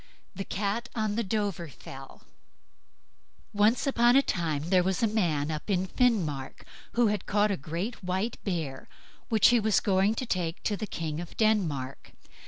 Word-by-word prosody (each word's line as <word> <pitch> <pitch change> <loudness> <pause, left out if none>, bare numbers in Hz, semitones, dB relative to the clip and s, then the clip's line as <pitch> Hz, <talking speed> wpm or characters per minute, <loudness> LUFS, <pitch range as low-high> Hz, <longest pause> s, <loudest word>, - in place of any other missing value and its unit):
THE 195 - -5
CAT 210 +5 -2
ON 215 -2 0
THE 230 - 0
DOVREFELL 175 - -5 1.3
Once 210 +4 +3
on 240 -2 +4
a 275 - +6
time 160 - -2
there 185 -1 +6
was 190 +3 0
a - - +5
man 165 -9 0
up 155 +6 -5
in 190 -2 +1
Finnmark 180 - 0 0.3
who 240 0 +3
had 210 0 -2
caught 205 +1 +2
a - - +1
great 175 - -5
white 190 +5 -2
bear, 160 -9 -3 0.4
which 220 -4 +5
he 240 0 +4
was 220 -1 +3
going 195 +2 +2
to 255 - -3
take 175 -6 -2
to 210 - 0
the 215 +1 -5
king 160 -4 -4
of 175 - -8
Denmark. 165 - 0
195 Hz, 165 wpm, -28 LUFS, 165-220 Hz, 1.3 s, a